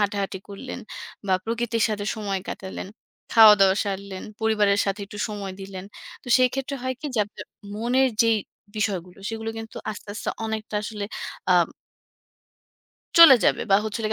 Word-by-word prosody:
হাঁটাহাঁটি 200 -1 -1
করলেন, 225 +7 -7 0.5
বা 190 - +3
প্রকৃতির 230 0 -1
সাথে 210 -1 -3
সময় 200 -3 -3
কাটালেন, 190 -1 -6 0.5
খাওয়া-দাওয়া 210 -4 +8
সারলেন, 195 -1 -5 0.2
পরিবারের 210 -2 +3
সাথে 195 +2 -1
একটু 205 0 -10
সময় 200 -2 -5
দিলেন। 190 -1 -7 0.4
তো - - -11
সেইক্ষেত্রে 265 +2 +1
হয় 260 0 -2
কি 305 - -4
যে, 225 - 0
আপনার 210 - -10 0.3
মনের 245 +4 +2
যেই 225 -1 +3 0.4
বিষয়গুলো 185 -4 -2
সেগুলো 225 0 -4
কিন্তু 225 0 -9
আস্তে, 210 - -10
আস্তে, - - -5 0.2
অনেকটা 220 -1 -4
আসলে, 210 -1 -5 0.4
অ্যাম - - +5 1.5
চলে 330 -5 +11
যাবে - - +3
বা 195 - +7
হচ্ছে 220 +1 -3
হল 220 - -1
গিয়ে - - +2
215 Hz, 155 wpm, -24 LUFS, 200-225 Hz, 1.5 s, চলে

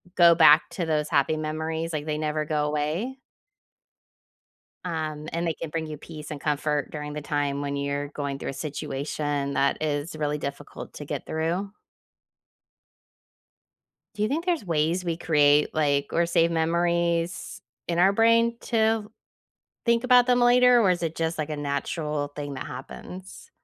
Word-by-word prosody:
go 170 -1 +7
back 155 -2 +7
to 175 - -3
those 155 -2 0
happy 155 0 +2
memories, 160 +1 -3
like, 150 0 -3
they 150 -1 -1
never 155 0 -1
go 150 -1 -1
away 155 - -2 1.7
um, 155 -3 -4
and 170 +1 -1
they 165 - 0
can 165 - -6
bring 160 0 -3
you 155 -1 -6
peace 150 0 -10
and 145 -2 -6
comfort 150 -1 -1
during 150 -1 -6
the 150 - -5
time 145 -1 -1
when 140 0 -3
you're 140 0 -2
going 140 -1 -4
through - - -4
a - - -6
situation 145 0 -3
that 140 +2 +1
is 150 +1 -2
really 150 -1 -1
difficult 140 -1 -7
to - - -8
get - - -4
through. 170 +5 -2 2.4
Do 210 - -3
you 215 - +2
think 325 +7 -2
there's 340 - 0
ways 165 +2 0
we 170 -1 -1
create, 150 -3 +3
like 140 -2 +1
or 170 - +3
save 170 -1 +3
memories 170 +1 0 0.3
in 170 0 -1
our 190 +3 +5
brain 230 +2 +4
to 220 -2 +1 0.7
think 235 +1 +2
about 250 -1 +6
them 245 -1 +3
later, 245 0 +6
or 195 -4 +4
is 175 -1 0
it 165 0 -2
just, 165 0 -1
like, 155 0 -2
a 150 - -2
natural 145 +1 -2
thing 145 -1 -5
that 130 - -6
happens? 180 +8 -9
155 Hz, 165 wpm, -26 LUFS, 150-175 Hz, 2.4 s, go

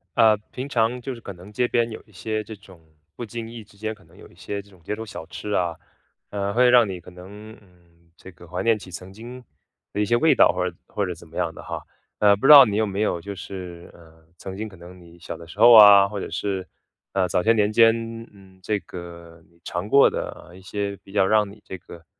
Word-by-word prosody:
啊， 110 -1 +5
平 130 +2 -6
常 120 0 0
就 135 +1 -5
是 120 - -10
可 100 - -9
能 90 +3 -14
街 125 +3 0
边 120 -1 +1
有 110 - -8
一 105 - -24
些 110 +3 -4
这 110 +1 -9
种 95 -3 -17 0.4
不 120 - -5
经 115 +1 -7
意 115 -2 -10
之 100 - -22
间 110 +1 -4
可 95 -4 -20
能 85 +2 -22
有 - - -14
一 - - -22
些 100 +3 -6
这 100 - -22
种 95 -3 -21
街 105 - -4
头 110 +1 -7
小 90 -6 -9
吃 105 - -7
啊， 85 -4 0 0.5
呃， 100 0 -3
会 125 +2 +4
让 120 -2 +6
你 95 -2 -6
可 90 - -14
能， 100 +5 -12
嗯， 85 -3 -27
这 95 - -13
个 85 -1 -16
怀 90 +2 -4
念 115 -2 +2
起 95 - -12
曾 90 +1 -9
经 120 +5 -11 0.5
的 - - -4
一 105 - +2
些 120 - +2
味 160 +7 +4
道 - - +5
或 90 0 -1
者 - - -16
或 100 - -2
者 90 - -4
怎 85 0 -15
么 80 - -17
样 - - -1
的 - - -11
哈。 - - -7 0.4
那 105 -1 +6
不 100 +7 0
知 - - +11
道 140 -2 +12
你 105 -4 -1
有 110 - +2
没 100 0 -3
有 95 -5 0
就 100 +3 -7
是， 90 -3 -9
呃， 80 -1 -19
曾 95 +2 -8
经 110 +2 -5
可 95 - -15
能 90 +2 -13
你 85 0 -17
小 - - -7
的 85 - -12
时 95 - -13
候 120 +2 +8
啊， 100 -2 +9
或 105 +1 -7
者 - - -7
是， 95 0 -3 0.5
呃， 95 -1 +1
早 90 - 0
些 115 - +4
年 105 -2 +2
间， 115 0 +6 0.4
嗯， 95 -2 -19
这 105 +2 -1
个 85 -2 -11
你 85 - -28
尝 90 +4 -4
过 140 +4 +6
的 90 - -7
一 95 - -14
些 100 +1 -4
比 - - -16
较 95 -2 +2
让 105 0 +2
你 105 +1 -16
这 95 - -7
个 85 -2 -14
100 Hz, 280 characters per minute, -23 LUFS, 90-110 Hz, 0.5 s, 道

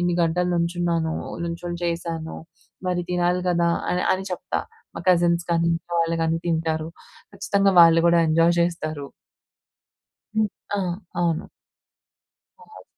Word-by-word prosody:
ఇన్ని 175 0 +1
గంటలు 175 +2 +1
నుంచున్నాను. 170 -1 0 0.2
ఓ - - -8
నుంచొని 175 +1 -5
చేశాను. 165 -1 -3 0.5
మరి 180 -1 0
తినాలి 180 0 +1
కదా! 170 -1 +2 0.2
అని. 180 +1 0
అని 190 +1 -5
చెప్తా. 180 +1 -3 0.4
మా - - -4
కజిన్స్ 170 -1 +3
కానీ, 170 0 +2
ఇంట్లో 170 +1 -6
వాళ్ళు 165 0 -1
కానీ 165 0 +1
తింటారు. 160 -1 -1 0.5
ఖచ్చితంగా 200 0 +2
వాళ్ళు 165 -1 +7
కూడా 170 0 +4
ఎంజోయ్ 165 +2 +4
చేస్తారు. 155 -4 -3 1.3
హ్మ్. 215 -1 +2 0.3
ఆ! - - 0 0.4
అవును. 165 -2 0 1.1
బావుంది. 445 -1 -15
170 Hz, 130 wpm, -23 LUFS, 165-180 Hz, 1.3 s, వాళ్ళు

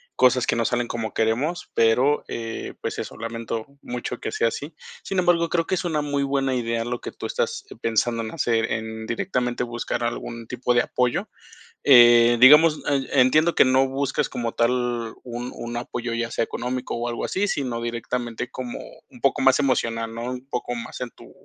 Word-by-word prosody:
cosas 125 -1 +4
que - - +1
no 115 - +1
salen 120 +1 0
como 110 -3 -3
queremos, 125 +10 -1
pero, 125 +6 +3
eh, 115 -1 -5
pues, - - -3
eso, - - -6
lamento 115 -1 -4 0.2
mucho 125 0 -5
que - - -4
sea 115 - +1
así. 150 +6 -7 0.3
Sin 195 - -4
embargo, 175 -2 +3
creo 165 -1 +1
que - - -3
es 185 - -1
una 155 -4 0
muy 145 -1 -1
buena 135 -1 0
idea 115 -2 -1
lo 120 0 -4
que - - -6
tú - - -8
estás 480 -3 -2 0.2
pensando 115 +1 +1
en 110 - -4
hacer, 115 -8 0
en 110 0 -4
directamente 125 +1 -1
buscar 120 0 -3
algún 115 0 -4
tipo 125 +1 -1
de 120 - +5
apoyo. 125 -1 -1 0.5
Eh, 120 -3 +7
digamos, 150 +4 +8
e 135 -1 +2
entiendo 155 +7 +4
que - - +5
no 130 +1 +4
buscas 135 0 -1
como 115 -1 -3
tal 120 -1 0
un 120 0 -6
un 120 0 -6
apoyo, 120 0 -4
ya 120 0 -2
sea - - 0
económico 125 +2 -4
o 120 +1 -2
algo 120 -1 -3
así, 200 +2 0
sino 130 -9 -2
directamente 120 0 -4
como 125 -2 -6 0.3
un - - -16
poco - - +2
más - - +5
emocional, 115 -4 0
¿no?, 115 +1 -5
un 125 +1 -7
poco 125 -2 -3
más 120 +1 -7
en 125 -2 -4
tu - - -16
120 Hz, 195 wpm, -24 LUFS, 115-135 Hz, 0.5 s, digamos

